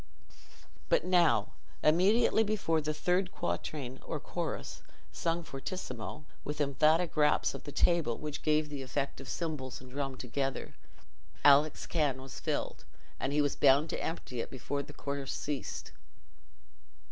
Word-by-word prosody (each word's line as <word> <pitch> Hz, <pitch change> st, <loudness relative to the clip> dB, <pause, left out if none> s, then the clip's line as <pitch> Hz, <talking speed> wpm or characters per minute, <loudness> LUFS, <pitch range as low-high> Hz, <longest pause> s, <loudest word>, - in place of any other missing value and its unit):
But -, -, +3 dB
now, 175 Hz, -3 st, +4 dB, 0.3 s
immediately 195 Hz, +8 st, +5 dB
before 200 Hz, -7 st, +1 dB
the 155 Hz, 0 st, -1 dB
third 180 Hz, +4 st, +1 dB
quatrain 125 Hz, -, -3 dB
or -, -, -3 dB
chorus, -, -, -4 dB, 0.3 s
sung 170 Hz, +1 st, -1 dB
fortissimo, 150 Hz, -, -6 dB, 0.2 s
with 150 Hz, +1 st, -4 dB
emphatic 155 Hz, +4 st, +3 dB
raps 150 Hz, -1 st, +3 dB
of -, -, -8 dB
the 145 Hz, -, -6 dB
table, 165 Hz, -8 st, +2 dB
which 150 Hz, -1 st, -5 dB
gave 155 Hz, 0 st, +2 dB
the 145 Hz, -2 st, -5 dB
effect 135 Hz, +1 st, -3 dB
of 135 Hz, -, -9 dB
cymbals 150 Hz, -7 st, -3 dB
and 130 Hz, -1 st, -13 dB
drum 135 Hz, -1 st, -3 dB
together, 135 Hz, +2 st, -3 dB, 0.7 s
Alick's 145 Hz, +2 st, +6 dB
can 145 Hz, -6 st, +1 dB
was 135 Hz, 0 st, -8 dB
filled, -, -, -2 dB, 0.4 s
and 135 Hz, -, -1 dB
he 150 Hz, +1 st, +3 dB
was 145 Hz, -, 0 dB
bound 140 Hz, +3 st, +5 dB
to -, -, -3 dB
empty 125 Hz, -7 st, -3 dB
it -, -, -5 dB
before 140 Hz, +2 st, -3 dB
the 140 Hz, -, -10 dB
chorus 140 Hz, -1 st, -4 dB
ceased. 145 Hz, -2 st, -4 dB
145 Hz, 145 wpm, -32 LUFS, 135-160 Hz, 0.7 s, Alick's